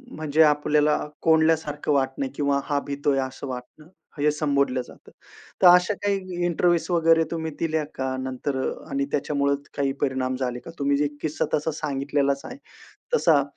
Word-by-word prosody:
म्हणजे 155 0 +1
आपल्याला 150 0 +3 0.2
कोंडल्यासारखं 160 -2 +2
वाटणे, 135 0 0
किंवा 140 -1 +1
हा 145 -1 0
भीतोय 140 -1 0
असं 130 +1 -4
वाटणं 130 +4 -8 0.3
हे 150 +1 +3
संबोधलं 140 -4 0
जातं. - - -16 0.5
तर 185 - +8
अशा 180 +3 +6
काही 185 -3 -1
इंटरव्ह्यूज 175 0 +2
वगैरे 165 -1 +4
तुम्ही 160 -1 -3
दिल्या 160 -1 0
का, 130 0 -2
नंतर 130 +2 -3 0.3
आणि 140 0 -1
त्याच्यामुळे 140 -1 +1 0.2
काही 140 -1 +1
परिणाम 130 -2 0
झाले 125 -1 -3
का. 165 - -11
तुम्ही 140 0 +2
जे 145 +1 +2
किस्सा 155 0 -1
तसा 150 +2 +1
सांगितलेलाच 140 -2 -1
आहे. 255 - -8 0.6
तसा - - +4
145 Hz, 150 wpm, -24 LUFS, 140-160 Hz, 0.6 s, तर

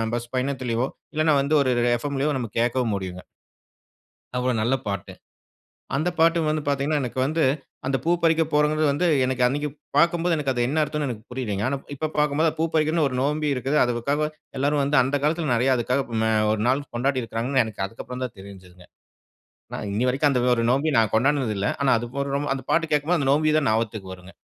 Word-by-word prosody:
Bus 120 0 -5
பயணத்திலயோ! 130 -2 -1 0.3
இல்லன்னா 155 -1 +3
வந்து 145 +3 +1
ஒரு 130 -2 +1
ஒரு 120 - +2
எஃப்எம்லயோ 140 +2 -1
நம்ம 120 -4 -4
கேட்கவும் 120 -2 +1
முடியுங்க. 90 -1 -5 1.2
அவ்ளோ 125 0 +1
நல்ல 125 +4 +2
பாட்டு. 100 -3 -4 0.8
அந்த 160 +5 +1
பாட்டு 165 +1 +4
வந்து 155 0 0
பார்த்தீங்கன்னா, 145 +2 +1
எனக்கு 125 +1 -4
வந்து 160 +1 0 0.4
அந்த 135 0 +1
பூ 170 - +1
பறிக்க 165 0 +4
போறோங்கிறது 150 +1 +2
வந்து, 175 +5 +1 0.2
எனக்கு 130 -1 0
அன்னக்கி 145 +3 -2 0.3
பார்க்கும்போது 170 +1 +3
எனக்கு 140 -3 -1
அது 120 - -1
என்ன 155 +4 0
அர்த்தனோன்னு 150 -2 -2
எனக்கு 110 -1 -8
புரியலைங்க. 105 -6 -3
ஆனா, 140 +1 -1 0.2
இப்ப 155 +2 -3
பார்க்கும்போது 150 +2 +2
அது 155 - -10
பூ 165 - +2
பறிக்கிறதுன்னு 155 0 +2
ஒரு 130 - -5
நோன்பி 150 +1 0
இருக்குது. 135 +4 0
அதுக்காக 140 +6 0 0.3
எல்லாரும் 145 +1 +1
வந்து 145 +2 +2
அந்த 135 +3 -1
காலத்தில 155 -1 0
நிறைய 130 +3 +2
அதுக்காக 125 +3 0 0.2
ம 110 - +2 0.2
ஒரு 105 - -2
நாள் 135 +3 +2
கொண்டாடி 130 +1 0
இருக்குறாங்கன்னு, 120 +3 0
எனக்கு 105 -3 -5
அதுக்கு 115 +4 -9
அப்பறந்தான் 125 -2 -5
தெரிஞ்சதுங்க. 95 -2 -13 0.9
நான் 105 - -4
இன்னிய 115 +5 0
வரைக்கும் 140 +3 +2
அந்த 125 -2 +1 0.2
ஒரு 115 - 0
நோன்பி 140 +5 +2
நான் 110 -2 +2
கொண்டாடுனது 130 -1 +2
இல்ல. 100 - 0
ஆனா, 135 - +3
அது 120 - -5
போடுறம்மோ 140 +1 -1
அந்தப் 130 -1 -7
பாட்டு 165 -1 +1
கேட்கும்போது 150 +3 +2
அந்த 135 -1 +1
நோன்பி 155 +1 +2
தான் 145 -6 +1
ஞாபகத்துக்கு 110 -4 -2
வருங்க. 90 +1 -14
135 Hz, 190 wpm, -24 LUFS, 120-150 Hz, 1.2 s, பாட்டு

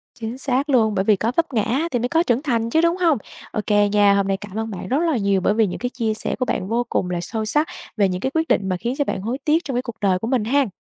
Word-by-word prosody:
Chính 230 +1 -5
xác 270 +2 0
luôn, 220 -6 +3
bởi 190 +1 0
vì 215 - +5
có 225 +4 -1
vấp 330 -4 0
ngã 220 - +2
á, 275 +10 0
thì 245 - 0
mới 245 +2 -1
có 330 +1 +3
trưởng 245 -2 +1
thành 230 -6 0
chứ, 320 +6 +3
đúng 340 +2 +2
hông? 330 -6 +3 0.3
OK 210 - -3 0.3
nha, 205 -1 +5
hôm 200 -1 +1
nay 195 0 0
cảm 205 +1 -9
ơn 225 0 -3
bạn 185 - -6
rất 265 - +1
là 265 - +1
nhiều 200 -3 +1
bởi 205 - +2
vì 220 -1 +3
những 180 - -5
cái 245 - -2
chia 230 -3 -1
sẻ 215 - -3
của 255 - +1
bạn 185 - -2
vô 235 +3 0
cùng 180 - -1
là 175 -1 -2
sâu 220 +4 -3
sắc 300 +8 +2 0.3
về 200 -2 +3
những 180 +1 -3
cái 265 - -1
quyết 320 0 0
định 195 -1 +1
mà 185 - 0
khiến 240 +7 -3
cho 285 - +1
bạn 190 - -3
hối 235 +5 -2
tiếc 315 +3 +3
trong 270 - -4
cái 250 - +1
cuộc 235 -3 -8
đời 190 -3 +2
của 225 - -4
mình 245 -3 +1
ha. 275 +4 +2
230 Hz, 320 wpm, -21 LUFS, 205-265 Hz, 0.3 s, vì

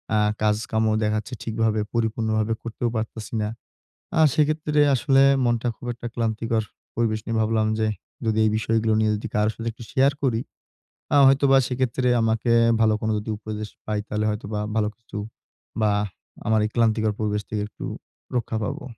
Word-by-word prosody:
আ - - +4 0.2
কাজকামও 110 +1 +1
দেখা 105 0 +1
যাচ্ছে 110 +4 -9
ঠিকভাবে 110 -1 0
পরিপূর্ণভাবে 110 -1 0
করতেও 115 +1 -3
পারতাছি 110 -1 -4
না। 105 - 0 0.7
আ - - +4
সেক্ষেত্রে 150 0 +2
আসলে 135 +1 +3 0.2
মনটা 120 0 +1
খুব - - -11
একটা 120 0 -7
ক্লান্তিকর 115 -1 0 0.3
পরিবেশ 110 -2 +1
নিয়ে 115 0 -1
ভাবলাম 110 0 +1
যে, 110 - +2 0.4
যদি 110 -1 +1
এই - - +4
বিষয়গুলো 110 0 +1
নিয়ে 110 -1 +2
যদি 105 - -5
কারো 105 0 +3
সাথে 115 0 -3
একটু 115 - -11
শেয়ার 135 0 +4
করি। 120 -4 +1 0.7
আ - - +6
হয়তোবা 135 0 +5
সেক্ষেত্রে 125 0 0
আমাকে 115 +1 +1 0.3
ভালো 110 -1 +4
কোনো 110 0 0
যদি 105 +1 -5
উপদেশ 110 0 -5 0.2
পাই, 105 -1 -1
তাহলে 105 0 -1
হয়তোবা 105 0 -3 0.2
ভালো 105 -1 +2
কিছু 115 -3 -9 0.6
বা 110 -1 +3 0.6
আমার 110 0 +3
এই 105 - -1
ক্লান্তিকর 110 -2 +2
পরিবেশ 105 -1 0
থেকে 105 -1 -2
একটু - - -10 0.5
রক্ষা 115 -2 -1
পাবো। 115 - -4
110 Hz, 165 wpm, -24 LUFS, 110-120 Hz, 0.7 s, আ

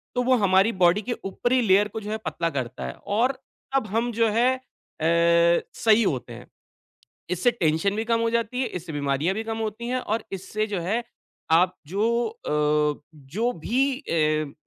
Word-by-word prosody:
तो 250 - +2
वो 255 +1 +4
हमारी 195 +1 +4
बॉडी 175 +4 +5
के 240 +3 -3
ऊपरी 240 +6 +1
लेयर 205 -1 +4
को 220 +2 -6
जो 210 0 -6
है 220 - -1
पतला 170 0 -1
करता 125 - -4
है 65 - -5 0.2
और 250 +4 +3 0.4
तब 260 -5 +1
हम 230 +3 0
जो 230 0 +2
है 230 +4 +3
अ, 170 -7 +1
सही 225 0 +4
होते 130 - -2
हैं। 120 +2 -11 0.8
इससे 180 +7 +2
टेंशन 175 -1 0
भी 220 - -1
कम 230 0 +1
हो 230 - +1
जाती 235 +2 -1
है, 255 - 0
इससे 170 -2 -7
बीमारियाँ 145 +5 0
भी 220 - -3
कम 225 0 -4
होती 225 +1 -4
हैं, 255 +1 0
और 225 -1 -2
इससे 210 +3 -3
जो 205 -3 -2
है 215 +8 -1 0.5
आप 180 +3 +4
जो 225 +6 +1
अ, 150 - 0
जो 165 - -2
भी 265 +3 +1
अ, 155 - 0
205 Hz, 185 wpm, -25 LUFS, 165-230 Hz, 0.8 s, बॉडी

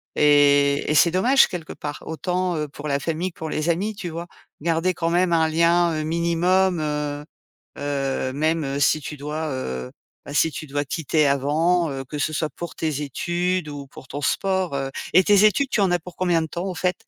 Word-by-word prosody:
Et 145 -1 +4
et - - +1
c'est 155 +3 +5
dommage, 245 +10 +4
quelque 170 -3 -6
part. 145 0 -7
Autant, 180 +2 -2
heu, 150 -1 -2
pour 145 +1 -8
la 140 -1 0
famille 165 +5 -2
que - - -24
pour 160 - -4
les 155 +2 -1
amis, 200 +6 -2
tu 195 -3 -5
vois? 170 +1 -6 0.3
Garder 165 +3 +1
quand 165 -1 -1
même 175 +1 +2
un 160 -1 +3
lien, 170 +1 +3
heu, - - -2
minimum, 170 +3 +1
heu, 150 -1 -3 0.5
heu, 135 -2 -2
même, 150 -1 -1
si 155 +1 +3
tu 150 +1 -7
dois, 150 +3 -4
heu, 65 - -4 0.3
bah, 145 - -8
si 160 +1 +3
tu 155 - -6
dois 145 +1 -2
quitter 155 +1 0
avant, 155 +5 +2
heu, 135 -1 -5
que 150 +3 -7
ce 150 +2 -1
soit 155 0 -1
pour 170 - -8
tes 155 -3 -2
études 175 +4 -1
ou 145 -1 -7
pour 130 - -13
ton 145 - -5
sport, 190 +1 0
heu. 135 -1 -2 0.2
Et 185 +2 +7
tes 205 +1 +5
études 215 +7 +3
tu - - +1
en 195 -2 +3
as 175 - +2
pour 175 +1 -12
combien 175 -3 +1
de - - -2
temps, 170 +3 -5
au 190 - -3
fait? 180 +2 0
160 Hz, 215 wpm, -23 LUFS, 145-175 Hz, 0.5 s, Et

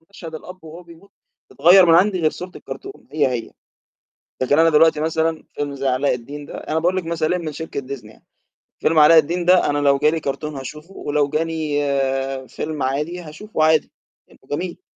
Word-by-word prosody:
مشهد 165 -5 -10
الأب 180 +2 -10
وهو 165 +3 -10
بيموت 170 +4 -17 0.4
تتغير 175 +5 +6
من 165 - +6
عندي 185 +1 +3
غير 155 -1 +2
صورة 180 +1 -8
الكرتون 390 -11 -10
هي 150 -3 +2
هي، 120 -2 -4 0.9
لكن 145 +4 +2
أنا 165 0 +5
دلوقتي 155 0 +4
مثلًا 160 0 -1
فيلم 145 -1 -3
زي 135 0 -2
علاء 130 +1 +1
الدين 145 +4 -8
ده، - - -8
أنا 160 - -2
باقول 175 +3 +1
لِك 185 - -2
مثالين 165 +1 -1
من 155 - -4
شركة 160 -2 -5
Disney 135 -3 -8
يعني، 110 - -17 0.6
فيلم 160 0 +2
علاء 155 +2 +7
الدين 170 +3 +2
ده 180 -3 +4
أنا 145 - 0
لو 140 -1 +3
جا 150 - +3
لي 165 - -1
كرتون 150 +1 -4
هاشوفه، 150 +7 -9
ولو 145 -3 -1
جا 155 +2 0
لي 140 -4 -1
فيلم 150 +2 -4
عادي 150 +7 -2
هاشوفه 160 +2 -4
عادي، 155 0 +3 0.4
لأنه - - -22
جميل. 175 - -4
155 Hz, 195 wpm, -20 LUFS, 140-170 Hz, 0.9 s, علاء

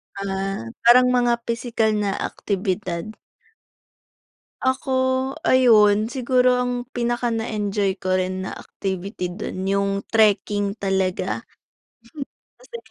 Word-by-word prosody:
Ah, 195 -6 -3 0.2
parang 250 +1 +7
mga 245 -1 +3
pisikal 230 -1 0
na 205 -1 0 0.2
aktibidad. 185 -3 -3 1.6
Ako, 260 0 0 0.5
ayun, 215 -4 +5
siguro 250 0 +2
ang 245 0 -2
pinaka 240 0 -1
na-enjoy 210 -3 -1
ko 185 0 +1
rin 185 0 -2
na 190 - -6
activity 190 -1 -5
do'n 190 0 -4
'yung 200 0 +1 0.2
trekking 205 -2 +2
talaga. 190 -3 -1 1.1
Kasi - - -10
210 Hz, 100 wpm, -22 LUFS, 195-240 Hz, 1.6 s, parang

